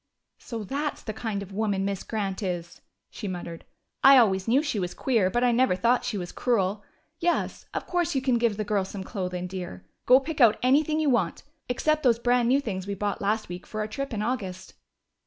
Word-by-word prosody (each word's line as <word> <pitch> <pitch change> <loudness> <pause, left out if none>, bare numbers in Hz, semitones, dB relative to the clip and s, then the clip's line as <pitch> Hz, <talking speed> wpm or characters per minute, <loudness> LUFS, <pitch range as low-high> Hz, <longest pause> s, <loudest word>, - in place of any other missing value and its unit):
"So 230 -3 -6
that's 285 +7 -3
the 215 - -4
kind 215 -2 -3
of 200 - -12
woman 200 -1 0
Miss 200 -1 -2
Grant 200 -2 -3
is!" 175 -3 -4 0.3
she 210 - -6
muttered. 175 -3 -6 0.4
"I 275 0 +9
always 190 -5 +3
knew 260 +6 +3
she 280 -9 -1
was 180 -2 -3
queer, 225 -8 +2
but 240 +5 0
I 245 - +4
never 245 -4 +3
thought 235 +7 +2
she 230 -4 -2
was 175 -2 -5
cruel.... 210 -4 0 0.4
Yes, 345 0 -1
of - - -4
course 350 -3 0
you 265 - +1
can 255 -3 +2
give 230 -3 +1
the 215 - -1
girl 205 -1 0
some 190 0 -6
clothing, 180 -3 -4
dear. 180 - -7 0.2
Go 255 +1 +8
pick 295 +1 -4
out 225 -3 +6
anything 305 +4 +3
you 305 -3 +2
want, 195 -9 0 0.3
except 305 +5 +1
those 245 -5 +4
brand 245 0 +2
new 270 +2 +4
things 195 -8 -4
we 200 - -2
bought 205 +1 -2
last 215 +2 0
week 175 +1 -8
for 215 - -5
our 215 - -1
trip 275 +6 -5
in 210 -2 -2
August." 190 -6 -4
215 Hz, 215 wpm, -26 LUFS, 190-250 Hz, 0.4 s, I